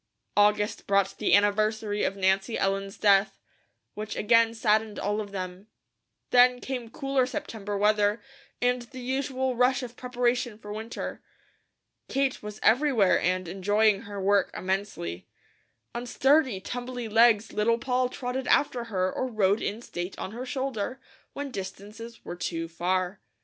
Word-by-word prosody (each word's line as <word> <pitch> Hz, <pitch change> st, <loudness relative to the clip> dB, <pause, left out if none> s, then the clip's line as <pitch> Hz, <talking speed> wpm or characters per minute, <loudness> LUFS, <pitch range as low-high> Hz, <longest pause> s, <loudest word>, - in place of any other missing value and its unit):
August 210 Hz, 0 st, +2 dB
brought 195 Hz, -1 st, +2 dB
the -, -, +4 dB
anniversary 210 Hz, +1 st, +1 dB
of 195 Hz, -, 0 dB
Nancy 195 Hz, +3 st, +1 dB
Ellen's 195 Hz, 0 st, -1 dB
death, 200 Hz, -1 st, +3 dB, 0.5 s
which 210 Hz, 0 st, -5 dB
again 230 Hz, +1 st, +3 dB
saddened 215 Hz, -1 st, +1 dB
all 205 Hz, +2 st, -1 dB
of 205 Hz, -, -7 dB
them. 185 Hz, +1 st, -6 dB, 0.6 s
Then 250 Hz, 0 st, +6 dB
came 250 Hz, -3 st, -5 dB
cooler 270 Hz, +1 st, 0 dB
September 220 Hz, -8 st, -4 dB
weather, 210 Hz, +1 st, +3 dB, 0.4 s
and 245 Hz, 0 st, +1 dB
the 255 Hz, +2 st, -10 dB
usual 260 Hz, 0 st, -1 dB
rush 255 Hz, +2 st, +2 dB
of 245 Hz, -1 st, -7 dB
preparation 245 Hz, -2 st, -1 dB
for 210 Hz, -1 st, -8 dB
winter. 220 Hz, +2 st, -6 dB, 0.9 s
Kate 275 Hz, -1 st, 0 dB
was 210 Hz, 0 st, -8 dB
everywhere 235 Hz, -5 st, +4 dB
and 185 Hz, 0 st, 0 dB
enjoying 205 Hz, +3 st, +2 dB
her 205 Hz, -3 st, -7 dB
work 195 Hz, 0 st, +3 dB
immensely. 185 Hz, -, -3 dB, 0.7 s
On 240 Hz, +1 st, -5 dB
sturdy, 265 Hz, -4 st, +3 dB
tumbly 245 Hz, +3 st, -5 dB
legs 225 Hz, 0 st, +4 dB
Little 230 Hz, +2 st, +2 dB
Poll 250 Hz, +1 st, 0 dB
trotted 250 Hz, +1 st, -4 dB
after 245 Hz, -4 st, +2 dB
her 185 Hz, -4 st, -1 dB
or 260 Hz, -, -2 dB
rode 210 Hz, -3 st, +2 dB
in 220 Hz, +4 st, -3 dB
state 175 Hz, -2 st, -6 dB
on 190 Hz, -, -5 dB
her 245 Hz, +4 st, -6 dB
shoulder, 260 Hz, -3 st, -3 dB, 0.3 s
when 285 Hz, -1 st, -5 dB
distances 210 Hz, +3 st, -8 dB
were -, -, -5 dB
too 165 Hz, -1 st, -3 dB
far. 180 Hz, +3 st, -1 dB
215 Hz, 145 wpm, -27 LUFS, 200-245 Hz, 0.9 s, Then